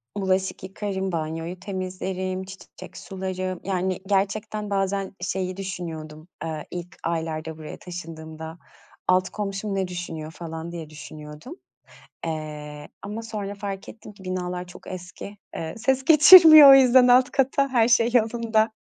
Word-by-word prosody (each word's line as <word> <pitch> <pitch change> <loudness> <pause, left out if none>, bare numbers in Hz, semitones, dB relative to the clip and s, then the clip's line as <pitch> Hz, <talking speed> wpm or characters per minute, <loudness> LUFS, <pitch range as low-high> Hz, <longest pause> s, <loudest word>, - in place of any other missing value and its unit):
Bulaşık 190 -1 -1
yıkarım, 195 0 -4
banyoyu 165 +2 -4
temizlerim, 185 0 -4
ç 190 0 -11
çiçek - - -13
sularım, 185 -1 -5
yani, 185 -1 -1
gerçekten 205 +2 -1
bazen 195 0 -1
şeyi 185 +1 -3
düşünüyordum, 160 -5 -7 0.2
eee, 160 -2 -5
ilk 175 0 -7
aylarda 160 -1 -3
buraya 155 -1 -9
taşındığımda, 160 -2 -8 0.5
altı 185 0 +2
komşum 200 0 -4
ne 190 -1 -1
düşünüyor 165 -3 -6
falan 165 +1 -7
diye 165 -3 -7
düşünüyordum. 150 - -10 0.7
Eee, 150 -2 -6
ama 210 +3 -6
sonra 210 -3 -5
fark 200 -1 -6
ettim 215 -1 -11
ki 195 -1 -16
binalar 180 -1 -4
çok 180 - -14
eski, 185 +3 -9 0.2
eee, 160 0 -5
ses 265 +3 0
geçirmiyor 310 -1 +10
o - - +11
yüzden 255 -1 +6
alt 250 +1 +5
kata, 275 +1 +1
her 240 -3 +3
şey 235 0 +4
yolunda. 225 -1 +2
185 Hz, 135 wpm, -24 LUFS, 165-210 Hz, 0.7 s, o